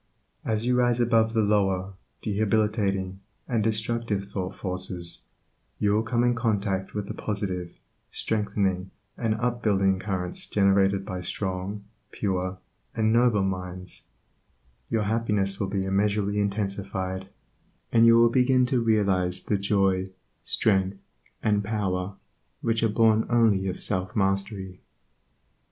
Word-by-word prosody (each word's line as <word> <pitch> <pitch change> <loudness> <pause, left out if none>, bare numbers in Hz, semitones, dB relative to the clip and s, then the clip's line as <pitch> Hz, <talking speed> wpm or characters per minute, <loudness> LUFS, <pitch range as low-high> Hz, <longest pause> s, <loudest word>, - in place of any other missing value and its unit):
As 110 0 -1
you 125 0 +2
rise 120 -1 +2
above 115 -1 +3
the 110 -1 +3
lower, 100 -2 +1 0.3
debilitating, 105 -3 0 0.3
and 115 -4 0
destructive 110 -1 -1
thought 95 -2 -4
forces, 90 -2 -3 0.6
you 105 - +1
will 105 - +3
come 120 +1 0
in 120 0 +3
contact 105 -5 -1
with 105 -1 -2
the - - -4
positive, 95 -4 -4 0.3
strengthening, 100 -4 -1 0.3
and 115 -2 0
up 120 +1 -1
building 95 -3 +2
currents 95 -3 -3
generated 100 -1 +3
by 95 -3 -4
strong, 95 +2 -3 0.3
pure, 95 -2 -2 0.4
and 110 -1 +2
noble 115 -4 +4
minds, 90 -1 -4 0.8
your 110 -2 +1
happiness 105 -3 0
will 100 - -1
be 95 -1 -1
immeasurably 100 +1 +1
intensified, 100 -2 -2 0.6
and 115 0 +6
you 115 0 +7
will 115 0 +6
begin 125 0 +4
to 125 -1 +1
realize 95 -5 +1
the 105 - 0
joy, 95 -1 +1 0.3
strength, 95 -2 +2 0.5
and 105 -1 +2
power, 100 -2 -2 0.5
which 115 0 0
are 115 - +3
born 110 0 +3
only 110 -5 +3
of 95 - -3
self 90 0 -2
mastery. 95 -1 -1
100 Hz, 130 wpm, -26 LUFS, 95-110 Hz, 0.8 s, you